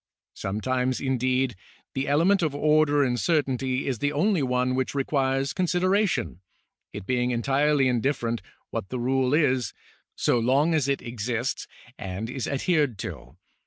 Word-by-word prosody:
Sometimes, 125 +6 -1
indeed, 130 -2 0 0.4
the 135 +1 -2
element 170 +8 +3
of 155 -4 0
order 150 -1 +3
and 125 -2 0
certainty 130 - 0
is 130 -5 -2
the 145 +3 0
only 180 +4 +2
one 125 -1 +1
which 130 +1 -1
requires 135 -1 0
consideration, 180 - +1 0.5
it 105 -1 -7
being 125 +1 0
entirely 135 +3 +2
in 125 -2 +1
different 120 -4 -1 0.3
what 95 - -4
the 130 - -3
rule 130 +1 +1
is, 130 -6 +1 0.4
so 120 - +2
long 135 +8 +2
as 150 -4 +1
it 140 -1 -1
exists 120 +2 -3 0.3
and 100 +5 -5
is 130 -1 -3
adhered 145 - +1
to. 65 -4 -8
130 Hz, 145 wpm, -26 LUFS, 125-145 Hz, 0.5 s, element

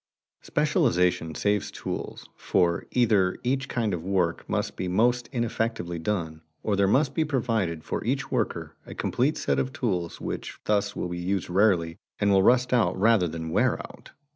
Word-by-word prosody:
Specialization 85 -2 +1
saves 105 +3 0
tools - - -6
for, 85 -1 +1
either 105 -7 +2
each 130 +1 -1
kind 115 -5 -1
of 85 -2 -3
work 90 -3 -1
must - - -1
be 95 - -3
most 120 +6 +2
ineffectively 115 - -2
done, 80 -3 -3 0.2
or 105 - +1
there 100 0 +3
must 135 +6 +2
be 160 - +1
provided 115 - -1
for - - -3
each - - -2
worker - - -2
a - - -10
complete 135 +5 0
set - - 0
of 130 - -1
tools 90 -10 -2
which - - -5
thus 105 -1 +1
will 90 - -3
be 90 0 -4
used 90 0 -2
rarely 90 -4 +2 0.2
and 100 0 +2
will 95 -1 +5
rust 125 +4 +3
out 120 -6 +2
rather 110 -3 +4
than 80 0 -5
wear - - +3
out. - - -11
100 Hz, 170 wpm, -26 LUFS, 90-120 Hz, 0.2 s, will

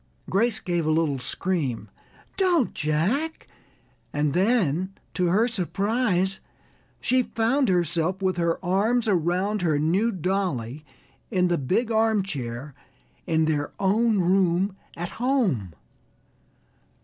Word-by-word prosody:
Grace 220 +3 +2
gave 175 -3 -1
a - - +3
little 155 -4 +1
scream. 145 -4 -2 0.5
"Don't, 350 - +2
Jack" 195 - -1 0.6
and 145 -1 0
then, 190 - +1 0.2
to 180 -1 +1
her 210 +7 +3
surprise, 195 - 0 0.6
she 255 0 +2
found 245 +2 +1
herself 175 0 0
with 185 -2 0
her 170 -1 +1
arms 220 +6 +2
around 185 +2 +1
her 160 -4 +2
new 180 +10 +2
dolly 170 - -2 0.5
in 180 -4 +2
the 175 - +2
big 205 - 0
armchair 165 - -1 0.5
in 160 -1 +2
their 150 -2 -1
own 215 +3 +2
room 185 +1 +2 0.2
at 175 +1 -4
home. 215 - +1
185 Hz, 115 wpm, -25 LUFS, 160-220 Hz, 0.6 s, a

